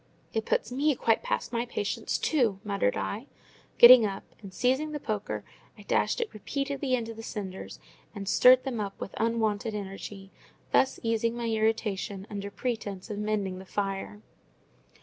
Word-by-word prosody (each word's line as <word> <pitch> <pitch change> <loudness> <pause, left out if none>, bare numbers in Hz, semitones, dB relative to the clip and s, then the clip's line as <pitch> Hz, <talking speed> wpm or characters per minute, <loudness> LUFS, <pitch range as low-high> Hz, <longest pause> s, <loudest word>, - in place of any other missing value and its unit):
"It 220 -1 -2
puts - - 0
me 285 +3 +2
quite 225 -2 +2
past - - -2
my 235 +1 -1
patience 205 -4 -2
too!" 235 -11 +1
muttered 200 - 0
I, 225 +7 -3 0.5
getting 240 0 +10
up; 195 -2 -2 0.2
and, 195 -2 -9
seizing 260 - 0
the 295 - -3
poker, 210 -5 -3 0.3
I - - -12
dashed - - +1
it 460 -2 -2
repeatedly 275 +4 -2
into 230 -2 -4
the 225 - -9
cinders, 195 -4 -6 0.4
and 200 -1 -6
stirred 255 +5 +7
them 255 -4 -3
up 200 -2 -4
with - - -6
unwonted 220 -1 0
energy; 195 -1 -7 0.4
thus 265 - +3
easing 230 0 +1
my 235 - -3
irritation 215 -3 -1
under 200 -1 -4
pretence 215 -3 -4
of 205 - -4
mending 205 -3 -1
the - - -9
fire. 195 - -4
220 Hz, 160 wpm, -28 LUFS, 200-245 Hz, 0.5 s, getting